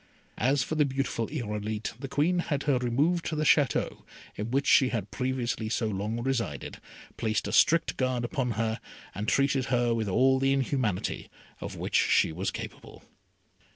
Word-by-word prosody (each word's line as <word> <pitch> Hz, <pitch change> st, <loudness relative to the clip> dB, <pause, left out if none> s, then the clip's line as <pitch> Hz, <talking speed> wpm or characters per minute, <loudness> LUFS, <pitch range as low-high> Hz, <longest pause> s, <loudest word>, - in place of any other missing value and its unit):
As 130 Hz, +2 st, +2 dB
for -, -, -4 dB
the 155 Hz, -1 st, +3 dB
beautiful 135 Hz, -4 st, -2 dB
Irolite, 105 Hz, -5 st, -4 dB
the 135 Hz, -, -5 dB
Queen 165 Hz, +7 st, +1 dB
had 145 Hz, -5 st, -1 dB
her 140 Hz, -4 st, +2 dB
removed 145 Hz, +8 st, +1 dB
to 160 Hz, -, -2 dB
the 155 Hz, -, 0 dB
Château 145 Hz, -5 st, +2 dB, 0.3 s
in 105 Hz, +2 st, -4 dB
which 135 Hz, +3 st, +1 dB
she 130 Hz, -2 st, +5 dB
had 105 Hz, -5 st, -3 dB
previously 120 Hz, -3 st, -2 dB
so 115 Hz, -, 0 dB
long 105 Hz, +2 st, -2 dB
resided, 115 Hz, -, -3 dB, 0.4 s
placed 110 Hz, -1 st, -1 dB
a -, -, -3 dB
strict 120 Hz, +11 st, +3 dB
guard 130 Hz, -2 st, 0 dB
upon 125 Hz, -3 st, -1 dB
her, 115 Hz, 0 st, -1 dB, 0.3 s
and 105 Hz, +2 st, -4 dB
treated 140 Hz, 0 st, +2 dB
her 120 Hz, -2 st, +1 dB
with 110 Hz, -3 st, -1 dB
all 130 Hz, +7 st, +4 dB
the 135 Hz, 0 st, +2 dB
inhumanity 130 Hz, -8 st, -1 dB, 0.3 s
of -, -, -6 dB
which -, -, -5 dB
she -, -, +4 dB
was 90 Hz, +5 st, -2 dB
capable. -, -, -8 dB
125 Hz, 170 wpm, -28 LUFS, 110-140 Hz, 0.4 s, she